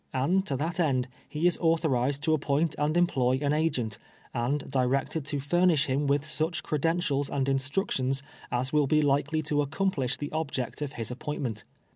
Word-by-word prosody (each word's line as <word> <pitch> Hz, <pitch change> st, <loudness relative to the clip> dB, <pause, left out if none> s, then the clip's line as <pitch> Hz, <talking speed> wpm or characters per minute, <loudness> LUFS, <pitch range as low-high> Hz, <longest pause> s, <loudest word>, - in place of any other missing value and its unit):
And 170 Hz, +9 st, +2 dB
to 140 Hz, -, -1 dB
that 165 Hz, +5 st, -2 dB
end, 130 Hz, -6 st, +2 dB, 0.2 s
he 155 Hz, +3 st, -2 dB
is 175 Hz, -, +3 dB
authorized 145 Hz, -5 st, +1 dB
to 160 Hz, 0 st, +3 dB
ap})oint 150 Hz, +1 st, +1 dB
and 150 Hz, +3 st, +1 dB
employ 130 Hz, -7 st, +2 dB
an 145 Hz, 0 st, +1 dB
agent, 145 Hz, -9 st, 0 dB, 0.3 s
and 130 Hz, +5 st, -1 dB
directed 135 Hz, +3 st, 0 dB
to 145 Hz, 0 st, -2 dB
fur 175 Hz, +6 st, +2 dB
nish 155 Hz, -5 st, +3 dB
]um 140 Hz, +2 st, +1 dB
with 140 Hz, +1 st, +2 dB
such 155 Hz, +2 st, -1 dB
credentials 150 Hz, -2 st, 0 dB
and 135 Hz, -1 st, -1 dB
instructions 135 Hz, -1 st, 0 dB, 0.3 s
as 130 Hz, +3 st, -1 dB
will 150 Hz, -2 st, +3 dB
be 155 Hz, +2 st, +3 dB
likely 145 Hz, +2 st, +1 dB
to 145 Hz, 0 st, +1 dB
accomplish 145 Hz, -4 st, -1 dB
the 145 Hz, -, -5 dB
object 145 Hz, -5 st, -3 dB
of 145 Hz, -2 st, -3 dB
his 115 Hz, 0 st, -5 dB
appointment. 125 Hz, -4 st, -4 dB
145 Hz, 175 wpm, -28 LUFS, 135-155 Hz, 0.3 s, is